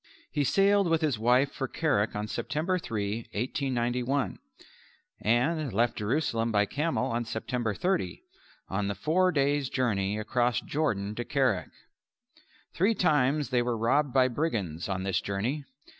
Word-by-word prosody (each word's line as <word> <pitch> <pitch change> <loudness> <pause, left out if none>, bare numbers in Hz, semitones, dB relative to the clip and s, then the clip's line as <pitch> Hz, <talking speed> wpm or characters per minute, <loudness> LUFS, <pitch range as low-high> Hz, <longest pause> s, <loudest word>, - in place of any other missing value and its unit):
He 145 - +1
sailed 200 +5 +3
with 165 0 +2
his 145 -8 0
wife 125 +4 +3
for 135 - -3
Kerak 110 -10 0
on 105 +1 -2
September 160 - -1
3, 105 -7 -2 0.2
1891, 125 +2 -1 0.8
and 135 +5 +1
left 115 +4 +1
Jerusalem 115 0 0
by 105 -1 +3
camel 145 +1 -1
on 120 +1 0
September 115 -1 -2
30, 170 - -1 0.4
on 100 +1 -1
the 100 - -2
four 175 - +2
days' 140 -2 +1
journey 105 -6 0
across 120 +2 +1
Jordan 105 -10 -1
to 120 - -3
Kerak. 130 - 0 1.0
Three 205 +6 +2
times 150 - +2
they 125 -1 +3
were 120 -1 -1
robbed 135 +6 +2
by 130 -1 +4
brigands 110 - -2
on 95 -1 -2
this 95 -1 0
journey. 120 +9 -2
125 Hz, 145 wpm, -28 LUFS, 105-150 Hz, 1.0 s, by